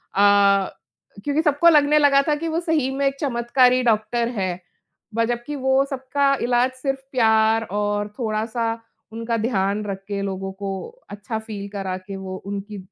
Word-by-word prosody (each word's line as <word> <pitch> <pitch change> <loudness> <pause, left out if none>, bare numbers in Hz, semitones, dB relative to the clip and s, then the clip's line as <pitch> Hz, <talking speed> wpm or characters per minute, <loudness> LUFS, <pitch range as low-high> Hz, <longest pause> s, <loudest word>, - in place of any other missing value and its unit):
अ, 200 -1 +4 0.5
क्योंकि 290 +4 +1
सबको 305 +1 +4
लगने 300 -1 +5
लगा 280 -1 +5
था 300 - +3
कि 325 +3 -4
वो 325 +1 0
सही 315 -6 0
में 280 +1 0
एक 275 - -1
चमत्कारी 250 -1 +3
डॉक्टर 235 +1 +1
है, 185 -2 -1 0.6
ब 230 - +2
जबकि 240 +5 -3
वो 265 +1 +3
सबका 275 +1 +1
इलाज 245 +1 +2
सिर्फ़ 270 -1 -1
प्यार 220 -2 +3
और 205 0 -1
थोड़ा-सा 225 0 -1 0.5
उनका 230 +1 -2
ध्यान 210 -2 0
रख 195 -1 -5
के 200 -1 -3
लोगों 195 -1 -4
को 200 0 -6 0.4
अच्छा 210 +2 -5
फील 215 -2 -7
करा 195 -2 -4
के 185 +1 -9
वो 190 -1 -6
उनकी 200 +1 -5
230 Hz, 165 wpm, -22 LUFS, 200-265 Hz, 0.6 s, लगने